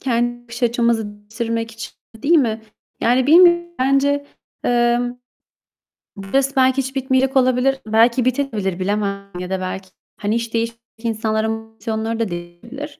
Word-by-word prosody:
kendi 240 -1 -1
bakış 235 +1 -10
açımızı 235 -3 +1
bitirmek 230 +1 -3
için, 225 - -8 0.2
değil 290 +10 +2
mi? 225 -6 +1 0.4
Yani 250 +2 +3
bilmiyorum 345 +2 +7
bence, 280 +2 +2 0.4
eee, 240 0 +3 1.2
bu 195 -1 -9
stres 275 +4 +1
belki 260 0 +4
hiç 265 0 -2
bitmeyecek 265 0 +1
olabilir, 255 +1 +2
belki 230 +3 +3
bitebilir 225 -8 -1
bilemem. 200 0 -2
Ya 180 0 -5
da 190 -1 -1
belki, 185 0 -5 0.3
hani, 210 +2 -1
iş 230 -1 -3
değiştirmiş 230 0 -2 0.2
insanların 220 -1 0
motivasyonları 225 0 -4
da 225 -4 0
değişebilir. 230 - -8
235 Hz, 140 wpm, -20 LUFS, 220-260 Hz, 1.2 s, bilmiyorum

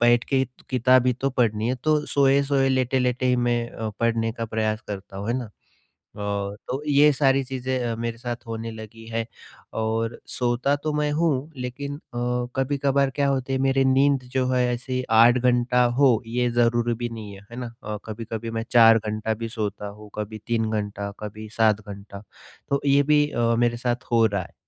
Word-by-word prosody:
बैठ 120 0 +4
के 135 -1 +2 0.3
किताब 130 0 +4
ही 125 - +4
तो 135 +3 -2
पढ़नी 115 -3 +1
है 125 - +1
तो 155 -1 +2
सोए-सोए, 140 0 +3
लेट-लेटे 130 -1 +1
ही 125 0 +3
मैं 120 -1 0
अ, 110 - -5
पढ़ने 115 -1 +1
का 115 0 -4
प्रयास 110 -1 -1
करता 100 -1 -7
हूँ, 100 +3 -5
है 120 - +1
ना? 120 -5 -7 0.7
अ, - - -8 0.5
तो 135 +3 -3
ये 145 +1 +6
सारी 135 -1 +3
चीजें 130 0 -3
अ, - - -2
मेरे 115 0 -4
साथ 120 0 -6
होने 115 0 -5
लगी 110 +1 -10
है 115 0 -2 0.5
और 115 +1 -1
सोता 125 +3 0
तो 155 - -1
मैं 150 0 0
हूँ, 150 -2 0
लेकिन 135 +3 -5
अ, - - -15 0.6
कभी-कभार 140 0 +1
क्या 140 -1 +2
होता 135 -1 -1
है 130 - +1
मेरी 135 0 +3
नींद 135 +1 +3
जो 130 -1 +1
है, 125 -1 +2
ऐसे 130 +1 -3
8 115 +2 +6
घंटा 125 0 +3 0.2
हो 125 -6 +5
ये 120 +2 0
ज़रूरी 120 0 +2
भी 120 +1 -3
नहीं 110 -3 -8
है, 100 +1 -14
है 120 - -9
ना? 120 -2 -6
अ, 105 0 -4
कभी-कभी 115 +1 -5
मैं 115 - -3
4 115 -2 +7
घंटा 110 0 -2
भी - - -3
सोता 105 -2 -4
हूँ, 105 +1 -12
कभी 105 +1 -5
3 115 -2 0
घंटा 105 -1 -3
कभी 110 +1 -7
7 110 -2 +4
घंटा 100 0 -9 0.5
तो 140 0 +1
ये 140 0 +5
भी 150 0 +3
अ, 115 -2 +1
मेरे 120 0 +2
साथ 120 +1 -2
हो 115 -1 +5
रहा 100 -3 -1
है। - - -13
120 Hz, 195 wpm, -24 LUFS, 110-130 Hz, 0.7 s, 4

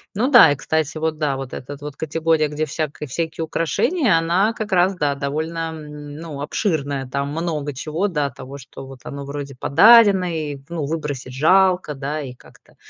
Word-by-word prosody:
Ну 245 +6 +1
да, 235 - +9
и - - +1
кстати, 160 +2 -1
вот 160 -1 -2
да, 145 -3 0
вот 135 -2 -7
этот 140 +2 -8
вот 150 -1 -7
категория, 160 0 +1
где 150 +1 -2
всяк 155 0 -4
всякие 160 +4 -3
украшения, 190 - +1
она 180 +7 +2
как 215 -1 -5
раз, 185 +1 +3
да, 145 -5 0
довольно, 160 +4 -3
м, 150 -1 -9
ну, 155 -3 -7
обширная, 145 - -2
там 140 +2 -2
много 150 -2 -3
чего, 155 +8 -2
да, 150 -7 -1
того, 135 +2 -10
что 135 0 -11
вот 135 -2 -12
оно 140 0 -7
вроде 140 -1 -6
подарено 205 - +6
и, 150 -3 -3
ну, 165 -3 -3
выбросить 145 -4 -4
жалко, 180 +2 +3
да, 145 +2 -4
и 130 -3 -7
как-то 125 - -21
155 Hz, 180 wpm, -21 LUFS, 140-165 Hz, -, да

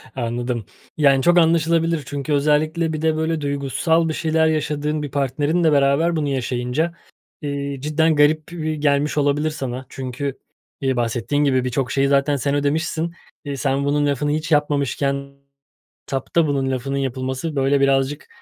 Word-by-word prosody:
Anladım. 120 -2 -3 0.3
Yani, 140 -3 +4
çok 175 0 +4
anlaşılabilir. 165 -1 +3
Çünkü 145 +2 -3
özellikle 155 +3 +1
bir 155 - -3
de 160 -1 +2
böyle 160 0 -1
duygusal 145 +4 0
bir - - -1
şeyler 160 0 +1
yaşadığın 150 -1 -1
bir 145 - -5
partnerinle 145 +4 +1
beraber 145 +4 +3
bunu 155 -2 -1
yaşayınca, 130 +5 -1 0.5
eee, 140 -1 -3
cidden 160 +2 +2
garip 150 +2 +2
e 155 -2 -2
gelmiş 145 0 +1
olabilir 145 +2 +2
sana. 130 -3 -5
Çünkü, 135 +1 -5 0.4
eee, 135 -1 +1
bahsettiğin 120 +5 0
gibi 130 -3 +2
birçok 125 0 -1
şeyi 135 0 +2
zaten 140 +1 +2
sen 140 +2 -1
ödemişsin. 160 +3 -1 0.3
Eee, 140 -1 -4
sen 140 0 0
bunun 145 +1 +1
lafını 145 +1 0
hiç 155 +2 -2
yapmamışken 140 -2 0 0.7
tapta 150 +4 0
bunun 135 -2 0
lafının 135 +2 -2
yapılması, 130 +3 -3
böyle, 135 +1 +2
birazcık 135 +2 +1
145 Hz, 150 wpm, -21 LUFS, 135-155 Hz, 0.7 s, Yani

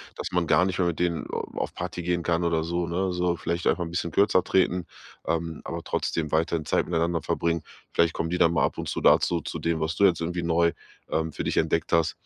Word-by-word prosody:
dass - - -4
man 90 -1 +1
gar 90 - +4
nicht 95 -2 -2
mehr 90 -2 +2
mit 85 - -2
denen 85 -3 0
a - - -2 0.2
auf - - -2
Party 90 0 -5
gehen 85 0 0
kann 85 +1 +1
oder 80 -1 +1
so, 85 +1 -1
ne? 90 +2 -1
So 90 -1 0
vielleicht 85 +1 -3
einfach 90 - +2
'n 85 - -5
bisschen 85 -1 -2
kürzer 100 -1 +3
treten, 90 -1 +1 0.4
ähm, 85 -1 -2
aber - - -4
trotzdem 80 -3 -2
weiterhin 80 0 +1
Zeit - - +1
miteinander 85 -1 0
verbringen. 85 -1 0 0.3
Vielleicht 85 -1 +2
kommen 80 - -2
die 90 - -1
dann 85 -1 +4
mal - - +2
ab - - -3
und - - -4
zu - - -3
dazu, 85 -2 +4
zu - - -5
dem, 85 -1 0
was 80 +1 -1
du 100 - +4
jetzt 85 -4 +3
irgendwie 85 +1 -2
neu, 85 0 +3 0.4
ähm, 80 0 -1
für - - -4
dich - - -2
entdeckt 80 - +1
hast. 85 -1 +2
85 Hz, 245 wpm, -26 LUFS, 80-90 Hz, 0.4 s, gar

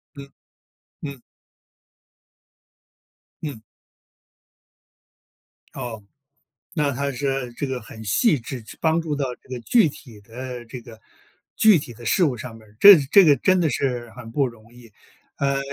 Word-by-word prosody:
嗯， 140 -1 -11 0.7
嗯。 140 -4 -7 2.2
嗯。 145 -8 -5 2.1
哦， 120 -4 -6 0.7
那 145 -4 +1
她 140 +2 -2
这 135 -1 -2
这 140 +4 -4
个 130 -2 -4
很 110 0 -11
细 150 - +2
致， 120 0 -7
这 - - -13
帮 160 +1 +2
助 155 -3 -3
到 130 -3 -2
这 - - -25
个 130 - -5
具 220 - +3
体 125 -7 -13
的 120 +3 -8
这 125 +1 -8
个 115 -2 -14 0.6
具 215 -6 +6
体 125 -4 -8
的 120 +1 -13
事 175 - +3
物 130 -5 0
上 115 0 -8
面 110 -1 -17
儿， 105 - -23
这 200 -1 +11
这 200 -2 +8
个 145 -3 +5
真 185 +7 +2
的 160 - +2
是 120 -3 -2
很 115 -1 -11
不 140 +3 +1
容 115 -1 -12
易， 120 -3 -16 0.4
呃 140 -1 0
130 Hz, 160 characters per minute, -23 LUFS, 115-145 Hz, 2.2 s, 这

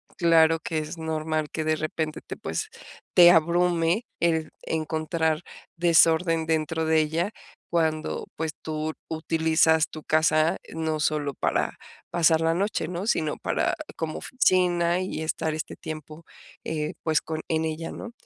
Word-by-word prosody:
claro 165 -2 +4
que 160 0 -3
es 155 +2 -4
normal 155 -1 -2
que 160 - -3
de 155 0 +1
repente 155 0 -3
te, - - -8
pues, 435 - -4 0.5
te 175 -1 +9
abrume 170 +4 +2
el 160 -2 +1
encontrar 160 0 -1 0.3
desorden 165 -1 +4
dentro 160 0 0
de 160 0 +3
ella, 165 +6 0 0.4
cuando, 160 -2 -1
pues, 160 0 -2
tú 155 0 -3 0.2
utilizas 160 0 +2
tu 155 - -9
casa, 155 0 +3
eh, - - -13
no 160 -1 -2
solo 150 -2 0
para - - -1 0.3
pasar 165 -1 +3
la 165 0 +2
noche, 190 -2 -1
¿no?, 180 +3 -4
sino 155 -8 +1
para - - 0 0.2
como 160 -1 -3
oficina, 180 -6 +2
y 185 -3 -4
estar 160 0 -1
este 155 0 -5
tiempo, 155 +1 -8 0.4
eh, 155 -1 -3
pues 160 -2 +2
con 160 0 -4
en 160 0 +1
ella, 160 +1 -4
¿no? 235 - -8
160 Hz, 150 wpm, -26 LUFS, 155-170 Hz, 0.5 s, te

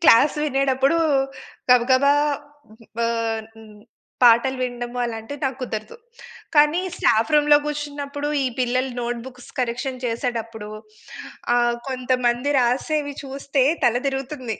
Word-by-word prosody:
Class 285 0 +6
వినేటప్పుడూ 275 +2 +2 0.7
గబగబా 255 +3 +5 0.6
హ్మ్, 225 +1 -18
బాన్ 230 -1 -1
హ్మ్, 215 -2 -15 0.4
పాటలు 245 +2 +5
విండము 245 0 -4
అలాంటివి 235 +4 -6
నాకు 265 0 -2
కుదరదు. 215 - -5 0.6
కానీ, 300 +4 +5 0.2
స్టాఫ్ 225 +5 +2
రూమ్‌లో 295 0 +6
గూర్చున్నప్పుడు, 290 0 -4 0.2
ఈ - - +2
పిల్లలు 255 +1 0
నోట్‌బుక్స్ 245 +1 -6
కరెక్షన్ 250 +1 -2
చేసేటప్పుడు 230 -2 -3 0.9
ఆహ్, 240 0 +2
కొంతమంది 255 +1 0
రాసేవి 285 +4 0
చూస్తే 275 0 -1 0.2
తల 240 +1 +3
దిరుగుతుంది. 270 -4 -3
250 Hz, 105 wpm, -22 LUFS, 235-275 Hz, 0.9 s, Class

